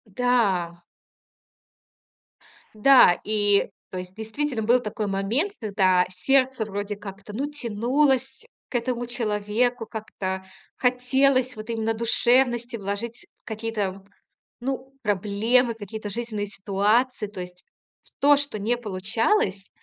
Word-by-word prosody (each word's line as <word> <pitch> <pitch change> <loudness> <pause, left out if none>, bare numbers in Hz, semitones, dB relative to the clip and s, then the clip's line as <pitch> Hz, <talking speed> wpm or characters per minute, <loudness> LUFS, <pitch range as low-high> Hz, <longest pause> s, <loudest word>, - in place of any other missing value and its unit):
Да. 195 -9 +1 1.9
Да 215 -5 +6
и, 205 -1 +2 0.2
то 185 - -6
есть, 180 +1 -8
действительно, 225 +3 -2
был 240 +3 +3
такой 210 -1 -3
момент, 220 - 0
когда 190 -4 +3
сердце 255 +5 +2
вроде 205 0 -4
как-то, 205 0 -9
ну, 280 +6 -2
тянулось 265 - 0 0.2
к - - -8
этому 245 0 -1
человеку, 230 +1 -1
как-то 190 -4 -5 0.3
хотелось 255 0 +2
вот 215 +1 -9
именно 225 -1 0
душевности 240 +1 +2
вложить 225 - -5 0.2
какие-то, 215 -4 -3 0.6
ну, 265 +1 -4
проблемы, 220 +4 +2
какие-то 215 -1 -7
жизненные 215 -1 -3
ситуации. 210 +4 +1
То 195 -3 -7
есть 180 0 -10 0.5
то, 290 0 +6
что 285 -6 -2
не 225 +4 0
получалось. 205 - 0
220 Hz, 110 wpm, -25 LUFS, 200-250 Hz, 1.9 s, Да